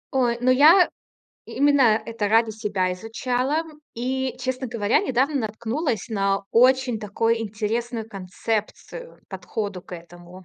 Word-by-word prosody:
Ой, 240 -3 +2
но 255 +1 +3
я 315 +8 +6 0.6
именно 270 -6 +3
это 220 -3 -2
ради 225 +1 +3
себя 205 -4 -1
изучала. 250 - -2 0.3
И, 260 +2 -2
честно 260 0 -3
говоря, 220 -2 +1
недавно 265 +3 0
наткнулась 225 - -3
на 195 -2 0
очень 250 -1 +3
такой 225 +2 0
интересную 225 +2 -3
концепцию, 215 - -5
подходу 200 -4 -5
к - - -19
этому. 175 +2 -12
230 Hz, 120 wpm, -23 LUFS, 210-255 Hz, 0.6 s, я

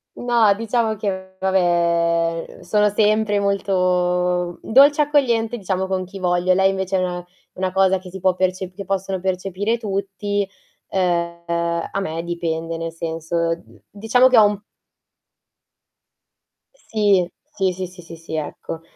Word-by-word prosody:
No, 235 -4 +3
diciamo 225 0 0
che 190 -2 -4
vabbè, 170 -3 +1
uhm, - - -14
sono 210 +4 +2
sempre 210 0 +2
molto 180 -3 +1
dolce, 285 +5 +6
accogliente, 240 -6 +1
diciamo 190 -2 -2
con 185 -1 -2
chi 195 +2 -10
voglio. 180 0 +2
Lei 190 +1 +4
invece 190 0 -1
no. 180 -1 -3 0.3
Una 185 0 -1
cosa 190 0 +3
che 185 -1 -11
si 190 - -7
può 185 0 +2
perce 185 0 -1
che 195 +1 -8
possono 195 -1 -2
percepire 190 +4 -1
tutti. 200 -1 -2 0.4
Uhm, 170 -2 -1 0.5
a 195 - -2
me 165 -3 -3
dipende, 165 -1 -3
nel 165 0 -5
senso 165 +1 -2 0.3
diciamo 225 +5 +3
che 250 - +4
ho 210 - +8
m 205 -1 -5 2.1
Sì. 205 - +1 0.3
Sì, 190 -1 +2
sì, 185 0 -5
sì, 175 -2 -12
sì, 160 -1 -8
ecco. 160 +1 -5
190 Hz, 135 wpm, -21 LUFS, 175-205 Hz, 2.1 s, ho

